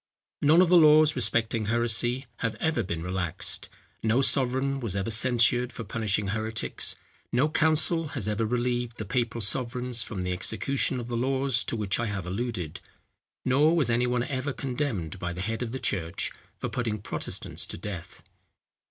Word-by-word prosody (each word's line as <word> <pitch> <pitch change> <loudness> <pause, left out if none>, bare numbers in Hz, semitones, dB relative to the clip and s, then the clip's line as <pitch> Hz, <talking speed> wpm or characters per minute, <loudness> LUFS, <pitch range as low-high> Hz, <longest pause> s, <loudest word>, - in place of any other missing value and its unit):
None 160 +5 +6
of 180 - +1
the 180 -1 +7
laws 155 0 +6
respecting 115 -2 +1
heresy 120 +3 +1
have 115 -2 -2
ever 155 +2 0
been 85 -5 -4
relaxed; 90 -2 -3 0.3
no 115 +3 +2
sovereign 135 +1 +3
was 115 -7 -3
ever 100 +3 -1
censured 120 +2 +3
for 115 - -7
punishing 105 -1 -1
heretics; 110 +1 -1 0.4
no 130 +5 +3
council 160 +1 +2
has 105 -5 -2
ever 105 +1 0
relieved 120 +1 -1
the 110 - -4
papal 120 +1 -1
sovereigns 125 +2 -1
from 100 -5 -4
the 90 - -2
execution 125 +7 -1
of 120 - -6
the 120 - -3
laws 130 0 +2
to - - -2
which 105 -3 -1
I 120 - 0
have 100 -4 -3
alluded; 95 -4 -4 0.6
nor 150 +6 +4
was 140 -8 +3
any 120 +1 +2
one 125 -1 +1
ever 135 +1 -3
condemned 125 - -3
by 90 0 -3
the 90 - -5
head 115 +4 -3
of 120 -2 -3
the 130 - -3
church 85 -9 -2 0.3
for - - -3
putting 115 -4 -2
Protestants 100 - -4
to - - -6
death. 95 -1 -7
120 Hz, 170 wpm, -27 LUFS, 105-130 Hz, 0.6 s, the